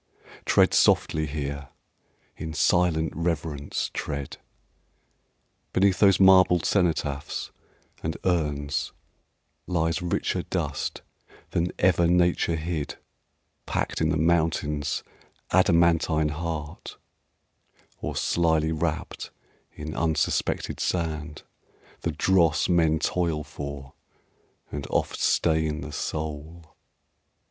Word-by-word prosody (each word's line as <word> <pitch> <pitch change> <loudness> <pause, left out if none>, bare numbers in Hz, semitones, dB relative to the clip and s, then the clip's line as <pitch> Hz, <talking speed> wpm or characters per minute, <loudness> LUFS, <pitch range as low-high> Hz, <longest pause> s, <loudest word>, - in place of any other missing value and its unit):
Tread - - +4
softly 80 0 +3
here, 70 -1 -4 0.7
in 80 0 -6
silent 80 -1 +2
reverence 80 -3 -2
tread. 70 -2 -4 1.4
Beneath 95 0 +3
those 95 -3 +5
marble 95 -2 +6
cenotaphs 80 -6 -1 0.5
and 80 0 -3
urns 75 -5 -1 0.7
Lies 80 -2 0
richer 85 -1 -1
dust - - -3 0.5
than 85 +1 +1
ever 85 -2 +3
nature 85 -1 +2
hid 80 -2 -3 0.7
Packed - - -2
in 80 - +2
the 80 - +1
mountain's 75 -3 0 0.5
adamantine 85 -4 +3
heart, 75 -1 -5 1.0
Or - - -4
slyly 80 -2 +1
wrapt 80 0 -3 0.4
in 75 +1 -7
unsuspected 80 -2 0
sand 80 -3 -2 0.6
The 85 - -2
dross 85 +1 +3
men 80 -3 +3
toil 80 -2 0
for, 70 -2 -8 0.8
and 70 -2 -5
oft - - -1
stain 80 -2 +1
the 75 +2 -7
soul. 80 +2 -5
80 Hz, 90 wpm, -26 LUFS, 75-85 Hz, 1.4 s, marble